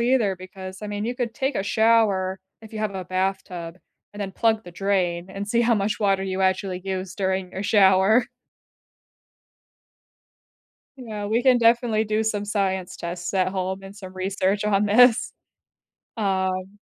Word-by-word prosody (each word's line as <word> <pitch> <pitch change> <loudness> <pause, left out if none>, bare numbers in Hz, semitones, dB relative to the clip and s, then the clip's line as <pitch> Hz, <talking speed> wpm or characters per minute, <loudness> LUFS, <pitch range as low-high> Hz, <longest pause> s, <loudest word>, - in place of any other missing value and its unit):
either, 235 -5 +2
because 185 +1 -9
I - - -4
mean, 205 0 -4
you 240 +2 -2
could 240 -2 -3
take 270 0 -1
a - - 0
shower 205 -4 +2 0.2
if 220 - -13
you 220 - -6
have 215 -2 -2
a 185 - -4
bathtub, 185 -2 -3 0.4
and 205 - -9
then 195 -1 -4
plug 220 +1 +1
the 175 - -10
drain, 180 -2 -1
and 195 +1 -6
see 235 +2 +2
how 235 0 +3
much 205 +1 -1
water 195 -2 +2
you 190 0 -3
actually 190 -1 0
use 190 -1 -4
during 190 -2 -1
your 190 - -4
shower. 200 +3 +4 2.7
Yeah, 215 -5 -6
we 225 +4 +1
can 255 -2 +5
definitely 230 -1 +3
do 215 +1 0
some 210 -2 -1
science 190 -3 -2
tests 175 +2 -5
at 185 -1 +2
home 190 0 -3
and 195 +1 -11
some 190 -2 -10
research 190 +2 -1
on 210 0 +2
this. 240 +3 +5 0.8
Um, 190 -1 -1
195 Hz, 165 wpm, -24 LUFS, 190-220 Hz, 2.7 s, can